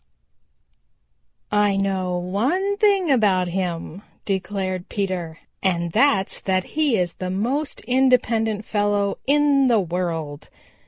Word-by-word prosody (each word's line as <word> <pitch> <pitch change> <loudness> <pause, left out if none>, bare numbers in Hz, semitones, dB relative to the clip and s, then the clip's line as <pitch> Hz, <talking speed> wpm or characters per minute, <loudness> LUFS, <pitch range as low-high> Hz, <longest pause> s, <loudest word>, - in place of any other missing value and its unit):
"I 205 -1 +2
know 190 -2 -1
one 265 - -1
thing 395 -6 +3
about 195 -8 +2
him," 175 0 -4 0.2
declared 190 -2 -3
Peter, 185 -5 -3 0.2
"and 170 -3 0
that's 210 - +2
that 185 -1 0
he 300 -7 +2
is 175 -2 -1
the 185 - -5
most 250 +11 -2
independent 230 -4 +1
fellow 205 -1 0
in 285 -1 +4
the 235 -3 +4
world. 165 -5 -3
200 Hz, 110 wpm, -22 LUFS, 185-250 Hz, 0.2 s, in